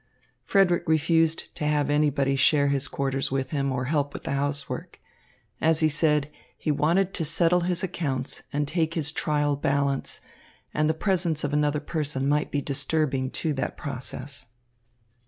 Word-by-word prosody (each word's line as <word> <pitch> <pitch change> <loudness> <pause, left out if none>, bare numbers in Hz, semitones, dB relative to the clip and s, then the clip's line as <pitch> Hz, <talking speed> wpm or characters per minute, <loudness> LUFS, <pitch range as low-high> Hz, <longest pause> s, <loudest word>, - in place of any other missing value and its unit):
Frederick 190 -4 +3
refused 160 +1 +2
to - - -6
have 150 -1 +1
anybody 145 -2 +2
share 140 +2 +4
his 140 -1 +1
quarters 135 0 -1
with 130 -1 -2
him 140 -2 0
or 130 0 -2
help 145 0 0
with - - -7
the - - -3
housework. 140 +1 -3 0.6
As 160 0 +3
he 155 - +4
said, 150 -1 +2 0.3
he 155 - -1
wanted 175 +6 +2
to 170 - -1
settle 170 +3 +3
his 180 +1 -1
accounts 140 -7 -3
and 145 0 -1
take 165 +1 0
his 150 -3 0
trial 145 -2 0
balance, 140 -1 0 0.5
and 150 0 +1
the 160 - +1
presence 170 -3 0
of 145 0 -2
another 150 0 +2
person 145 -3 -2
might 150 +1 +1
be 145 -1 -2
disturbing 140 -1 0
to 155 +3 -2
that 135 - -3
process. 135 -1 -5
150 Hz, 160 wpm, -26 LUFS, 140-160 Hz, 0.6 s, share